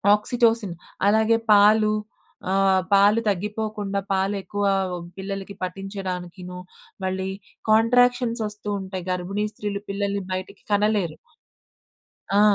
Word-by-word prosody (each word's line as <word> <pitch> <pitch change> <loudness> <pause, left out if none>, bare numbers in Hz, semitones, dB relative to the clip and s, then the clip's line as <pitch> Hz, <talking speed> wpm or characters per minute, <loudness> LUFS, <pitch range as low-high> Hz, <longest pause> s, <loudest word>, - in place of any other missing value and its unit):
Oxytocin. 225 -3 +1 0.3
అలాగే 220 +2 +4
పాలు. 210 +1 +6 0.6
ఆహ్, 190 0 +3
పాలు 200 +3 +6
తగ్గిపోకుండా 205 0 -2
పాలు 195 +2 +1
ఎక్కువ 205 +1 -3 0.5
పిల్లలకి 195 0 -5
పట్టించడానికీను, 180 -1 -5 0.5
మళ్ళీ 190 0 -2 0.4
కాంట్రాక్షన్స్ 245 +1 +4
ఒస్తూ 210 0 -8
ఉంటాయి. 190 -2 -6
గర్భిణీ 190 +4 -2
స్త్రీలు 205 -1 -4
పిల్లల్ని 200 0 -1
బయటికి 185 +2 -6
కనలేరు. 205 -5 +1 1.2
ఆ! - - +6
200 Hz, 95 wpm, -24 LUFS, 190-215 Hz, 1.2 s, పాలు